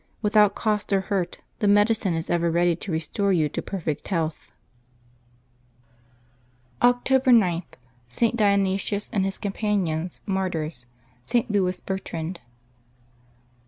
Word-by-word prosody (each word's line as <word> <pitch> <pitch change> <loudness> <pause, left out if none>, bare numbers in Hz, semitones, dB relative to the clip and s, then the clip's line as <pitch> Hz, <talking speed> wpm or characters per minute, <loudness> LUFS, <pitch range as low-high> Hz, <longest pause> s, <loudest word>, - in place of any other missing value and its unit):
Without 210 -1 +4
cost 210 -2 -1
or 195 -1 +3
hurt, 190 -3 -3 0.2
the 210 - +1
medicine 205 -2 +3
is 165 0 -3
ever 170 0 +2
ready 170 +1 +2
to 180 +3 -7
restore 165 +5 -1
you 160 -5 +3
to - - -4
perfect 160 -6 -4
health.^' 165 -4 -2 2.3
October 250 +2 +3
g.— 185 -7 +4 0.5
ST. 230 - +1
DIONYSIUS 200 -1 +1
and 195 -2 +1
his 195 0 -2
Companions, 195 -5 -2
Martyrs.— 165 - -2 0.4
ST. 235 - 0
LOUIS 185 -3 0
BERTRAND. 175 -2 -4
195 Hz, 115 wpm, -24 LUFS, 170-210 Hz, 2.3 s, Without